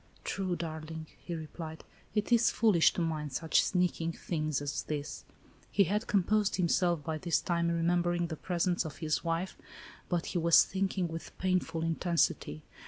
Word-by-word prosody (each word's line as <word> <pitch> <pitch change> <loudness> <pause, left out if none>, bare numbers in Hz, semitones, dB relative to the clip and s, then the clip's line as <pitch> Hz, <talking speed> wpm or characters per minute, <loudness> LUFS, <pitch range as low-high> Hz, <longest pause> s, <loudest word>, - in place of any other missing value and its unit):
"True, 185 -2 -2
darling," 160 -1 -5 0.2
he 175 - -4
replied, 160 0 -7 0.3
"it 210 +3 0
is 235 0 +5
foolish 205 -8 +4
to - - -2
mind 155 -4 -2
such 160 +4 +3
sneaking 175 -3 0
things 155 -4 -2
as 145 0 -2
this." 150 -1 -5 0.4
He 200 - +4
had 205 +5 -1
composed 205 +1 +2
himself 175 -2 +2
by 160 -1 -3
this 170 -1 +1
time, 170 -1 0
remem 170 +1 +2
bering 175 0 0
the 160 - -4
presence 175 +2 0
of 155 -4 -7
his 155 -2 -1
wife, 170 +2 -1 0.3
— - - -19
but 175 -2 0
he 175 - -1
was 170 0 +7
think 195 0 -2
ing 180 -2 +1
with 165 0 -8
painful 185 -3 0
intensity. 165 - 0
170 Hz, 170 wpm, -31 LUFS, 160-180 Hz, 0.4 s, was